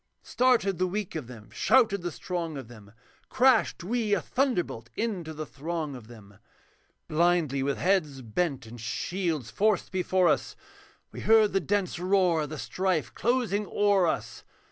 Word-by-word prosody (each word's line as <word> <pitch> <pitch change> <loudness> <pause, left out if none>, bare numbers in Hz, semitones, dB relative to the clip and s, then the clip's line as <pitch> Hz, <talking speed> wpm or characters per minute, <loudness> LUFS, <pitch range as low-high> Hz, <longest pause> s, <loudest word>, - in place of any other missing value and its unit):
Started 235 -8 +2
the 185 - +2
weak 200 +1 -4
of 155 -7 -5
them, 115 -4 -12
shouted 225 -7 +3
the 175 0 -3
strong 165 +4 -4
of 130 -4 -8
them, 105 -4 -14 0.4
Crashed 255 -7 +3
we 215 +1 0
a - - 0
thunderbolt 180 - -1
into 195 -8 -3
the 155 0 -6
throng 155 +1 -4
of 120 -4 -11
them, 105 -4 -15 0.7
Blindly 160 -4 +2
with 140 +1 -1
heads 155 -9 0
bent, 135 +3 -2
and 115 +1 -10
shields 150 - -2
forced 210 -2 +1
before 185 -1 +2
us, - - 0 0.6
We - - -8
heard 220 -1 +4
the 195 - +3
dense 195 -2 -1
roar 180 -3 +2
of 150 - -4
the 155 - -6
strife 180 -10 -1
closing 225 -3 0
o'er 200 -3 +3
us. - - -3
175 Hz, 160 wpm, -28 LUFS, 140-200 Hz, 0.7 s, heard